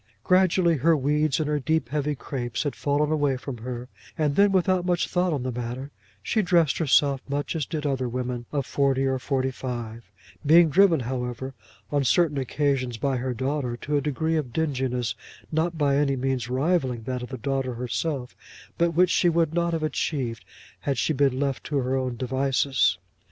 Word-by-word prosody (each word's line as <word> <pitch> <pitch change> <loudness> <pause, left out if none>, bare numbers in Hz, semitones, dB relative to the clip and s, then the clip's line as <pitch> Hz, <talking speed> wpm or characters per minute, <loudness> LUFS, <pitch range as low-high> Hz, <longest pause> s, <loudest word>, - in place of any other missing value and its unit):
Gradually 185 -2 +3
her 160 +4 +3
weeds 150 +1 +1
and 155 - 0
her 150 0 0
deep 150 -1 0
heavy 150 +1 -1
crapes 125 -1 -4
had 145 - -2
fallen 145 +1 0
away 145 -4 +1
from 130 -2 -7
her, 125 +1 -6 0.3
and 150 -2 +1
then, 200 +3 +5
without 185 -1 +2
much 175 -1 +1
thought 180 0 +1
on 140 -5 -1
the 130 - -2
matter, 125 +3 -5 0.3
she 220 - +1
dressed 170 -6 +2
herself 140 -3 +3
much 145 +4 -2
as 155 -5 -2
did 155 -2 -4
other 130 -3 0
women 125 -1 -4
of 140 -3 -1
forty 135 -1 +1
or 130 -1 0
forty 130 0 -1
five, 120 -3 -6 0.4
being 165 +2 +6
driven, 175 -3 +5
however, 125 +1 -4 0.4
on 145 -1 +2
certain 145 +2 +2
occasions 130 -2 -1
by 135 +2 0
her 125 0 -2
daughter 130 -1 -2
to 150 +4 -3
a 145 - +2
degree 160 +3 0
of 140 -6 -3
dinginess, 130 -5 -1 0.4
not 165 +2 0
by 145 -2 +2
any 140 -1 +2
means 130 -2 -2
rivalling 130 -3 0
that 125 +1 -3
of 125 - -7
the 130 - -5
daughter 135 0 -2
herself, 125 +2 -3 0.4
but 170 -1 +2
which 180 +1 +4
she 175 - +3
would 165 -2 +1
not 170 0 +1
have 165 -2 -2
achieved 130 - -2 0.4
had 140 -3 -2
she 155 - +1
been 135 -2 +2
left 140 -2 -1
to 145 - -2
her 130 0 0
own 130 -2 -2
devices. 130 -5 +1
140 Hz, 190 wpm, -25 LUFS, 125-155 Hz, 0.4 s, being